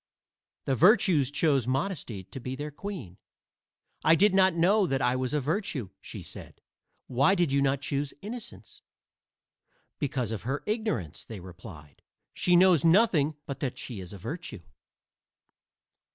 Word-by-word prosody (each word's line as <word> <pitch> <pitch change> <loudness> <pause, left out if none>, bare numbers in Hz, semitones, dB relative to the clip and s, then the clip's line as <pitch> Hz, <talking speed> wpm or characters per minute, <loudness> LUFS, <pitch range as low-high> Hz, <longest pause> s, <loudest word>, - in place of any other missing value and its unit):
The 135 - +1
virtues 170 - +4
chose 140 -4 +1
Modesty 130 - -2
to 135 - -9
be 130 +1 -5
their 150 +2 -5
queen. 160 - -7 0.8
"I 160 - +6
did 200 +3 +4
not 190 -2 +4
know 190 +4 +3
that 135 -3 0
I 125 0 +1
was 130 +2 -1
a - - +2
virtue," 145 - -2
she - - -8
said. - - -10 0.5
"Why 135 +10 +3
did 175 -6 +1
you 140 0 +2
not 140 0 +1
choose 140 0 -2
Innocence?" 235 +4 -9 1.2
"Because 130 -6 -2
of 110 - -4
her 135 +5 -3
ignorance," 215 - -2
they 110 -3 -9
replied. 85 - -12 0.3
"She 180 - +2
knows 180 -3 +5
nothing 165 -4 +4
but 140 - -6
that 135 -4 -3
she 120 -6 -6
is 90 -2 -8
a 100 - -8
virtue." 130 - -7
140 Hz, 150 wpm, -28 LUFS, 125-180 Hz, 1.2 s, I